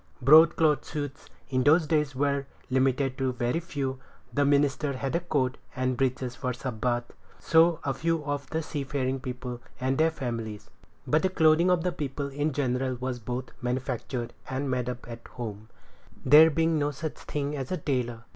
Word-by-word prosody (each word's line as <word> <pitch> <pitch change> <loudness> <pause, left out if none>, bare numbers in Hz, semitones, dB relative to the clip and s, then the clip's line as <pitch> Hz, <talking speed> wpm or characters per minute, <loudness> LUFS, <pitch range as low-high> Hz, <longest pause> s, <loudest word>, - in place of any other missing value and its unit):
Broadcloth 155 +1 +6
suits 145 -2 -6 0.2
in 130 -1 +2
those 155 +5 +5
days 150 -3 0
were 140 0 0 0.2
limited 130 0 +1
to 135 -1 +1
a - - -2
very 125 +5 0
few. 140 -6 -4 0.3
The 145 - +2
minister 140 0 +2
had 135 +3 -3
a - - +3
coat 140 -7 -1 0.2
and 130 0 0
breeches 130 -1 -1
for 125 -1 -2
Sabbath; 120 -1 -2 0.3
so 165 0 +4
of 135 -2 -2
a - - -17
few 165 -2 0
of 145 -1 -3
the 160 0 -2
seafaring 135 -3 -2
people 125 -1 -6 0.2
and 130 +2 0
their 160 +1 +5
families; 115 -8 -5 0.3
but 155 - +2
the 190 - +2
clothing 160 0 +4
of 180 -2 +2
the 180 - +1
people 140 -3 -4
in 145 +3 -1
general 130 -2 -1
was 125 0 -4
both 125 +3 -5
manufactured 125 -1 -3 0.2
and 130 +1 -2
made 125 -1 -1
up 125 0 -6
at 115 -1 -9
home, 110 -3 -7 0.6
there 150 +4 +9
being 160 0 +1
no 145 0 +1
such 150 +2 -5
thing 145 0 -3
as 135 -3 -5
a 185 - 0
tailor. 120 -6 -2
135 Hz, 180 wpm, -27 LUFS, 125-150 Hz, 0.6 s, there